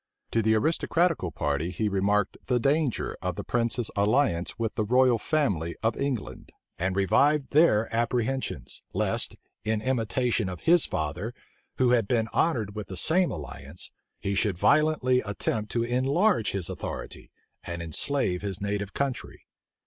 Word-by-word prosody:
To 115 - +2
the 110 0 +3
aristocratical 160 - +1
party 75 +2 -1
he 105 +4 -1
remarked 100 0 +1
the 125 -1 +2
danger 140 +1 0
of 90 -1 -2
the - - -5
prince's 120 -1 -1
alliance 100 -4 +1
with 115 -2 -2
the 110 - -1
royal 125 +1 +4
family 100 - 0
of 115 0 +1
England, 135 -6 -4 0.3
and 95 +2 0
revived 140 - +3
their 140 -8 +4
apprehensions, 120 - -2
lest, - - +1 0.3
in 110 0 0
imitation 120 -2 0
of 90 - -7
his 170 0 +4
father, 90 - -3 0.4
who 125 -2 +3
had 115 -5 +3
been 115 -2 +1
honored 115 -11 +1
with 105 -1 -6
the 95 - -6
same 175 - +4
alliance, 75 0 -6 0.3
he 100 - -2
should 100 -2 +1
violently 140 - +3
attempt 105 +1 -2
to 115 - +1
enlarge 130 - +2
his 95 -3 -3
authority, - - -6 0.3
and 85 -1 -5
enslave 90 - 0
his 100 -2 -4
native 100 -1 -3
country. 135 -3 -3
110 Hz, 150 wpm, -27 LUFS, 100-130 Hz, 0.4 s, royal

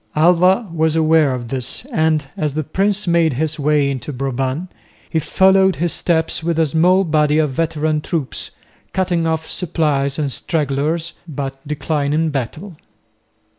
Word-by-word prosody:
Alva 180 +6 +4
was 160 -1 +1
aware 160 -2 +4
of 120 -2 -7
this, 130 - -4
and, 155 - +1
as 150 -2 -2
the 155 - -1
prince 195 +7 0
made 170 -3 +2
his 155 +4 -2
way 145 -1 +2
into 140 +1 -3
Brabant, 135 +5 -3 0.4
he 160 - 0
followed 190 +3 +3
his 170 0 -1
steps 160 -2 0
with 170 -1 -1
a 165 - +4
small 175 +6 +3
body 150 -3 +2
of 155 -3 +2
veteran 155 0 -1
troops, 150 -4 -3 0.4
cutting 175 -3 0
off 160 0 -1
supplies 150 -6 -1
and 145 -3 -1
stragglers, 155 +3 -1
but 135 -3 -5
declining 150 +1 -1
battle. 150 - -5
155 Hz, 145 wpm, -18 LUFS, 145-170 Hz, 0.4 s, Alva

